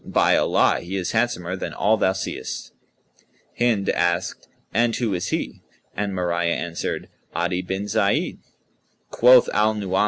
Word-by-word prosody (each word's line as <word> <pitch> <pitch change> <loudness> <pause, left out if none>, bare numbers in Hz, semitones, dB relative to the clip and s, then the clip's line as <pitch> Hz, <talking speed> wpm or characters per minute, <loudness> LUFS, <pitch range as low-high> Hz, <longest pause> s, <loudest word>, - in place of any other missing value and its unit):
By - - +3
Allah, - - +3
he 90 +3 -6
is 95 -2 -2
handsomer 110 -7 0
than 95 - -5
all 110 +2 +3
thou 95 -3 +2
seest!" 95 - -5 0.9
Hind 115 -5 +2
asked, 85 0 0 0.3
"And 115 0 +2
who 115 -5 -1
is 90 -1 -2
he?" - - -3 0.3
and 100 0 -2
Mariyah 85 -2 0
answered, 85 -1 -4 0.3
"Adi 90 +2 0
bin 95 +2 -4
Zayd." 105 -1 0
95 Hz, 125 wpm, -23 LUFS, 90-110 Hz, 0.9 s, By